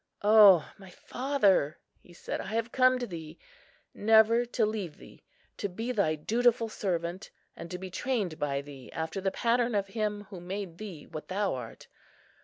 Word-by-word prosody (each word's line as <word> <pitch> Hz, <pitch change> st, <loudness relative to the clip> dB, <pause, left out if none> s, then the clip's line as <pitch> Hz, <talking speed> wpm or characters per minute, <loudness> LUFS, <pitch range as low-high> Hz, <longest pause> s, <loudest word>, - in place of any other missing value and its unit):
"O 205 Hz, -6 st, +7 dB
my 190 Hz, -1 st, -12 dB
father," 200 Hz, -, +1 dB, 0.2 s
he -, -, -20 dB
said, 175 Hz, -, -5 dB
"I 220 Hz, +4 st, -2 dB
come 255 Hz, +2 st, +3 dB
to 250 Hz, -, -3 dB
thee, 165 Hz, -4 st, -8 dB, 0.6 s
never 220 Hz, +2 st, +4 dB
to 240 Hz, -1 st, 0 dB
leave 210 Hz, -7 st, -4 dB
thee, -, -, -16 dB, 0.3 s
to 205 Hz, -, -3 dB
be 225 Hz, +7 st, -4 dB
thy 200 Hz, -10 st, +1 dB
dutiful 230 Hz, +7 st, +1 dB
servant, 175 Hz, -3 st, -3 dB, 0.3 s
and 170 Hz, -, -9 dB
to 180 Hz, -, -5 dB
be 185 Hz, 0 st, -8 dB
trained 205 Hz, -7 st, -2 dB
by 140 Hz, -1 st, -1 dB
thee 140 Hz, -3 st, -12 dB
after 160 Hz, +4 st, -4 dB
the 195 Hz, -, +1 dB
pattern 235 Hz, +2 st, +1 dB
of 195 Hz, -1 st, 0 dB
Him 210 Hz, -1 st, -2 dB
who 190 Hz, -, -7 dB
made 180 Hz, -1 st, -6 dB
thee 190 Hz, -8 st, -8 dB
what 155 Hz, -, -8 dB
thou 200 Hz, +1 st, -1 dB
art. 125 Hz, -3 st, -8 dB
200 Hz, 170 wpm, -29 LUFS, 170-225 Hz, 0.6 s, O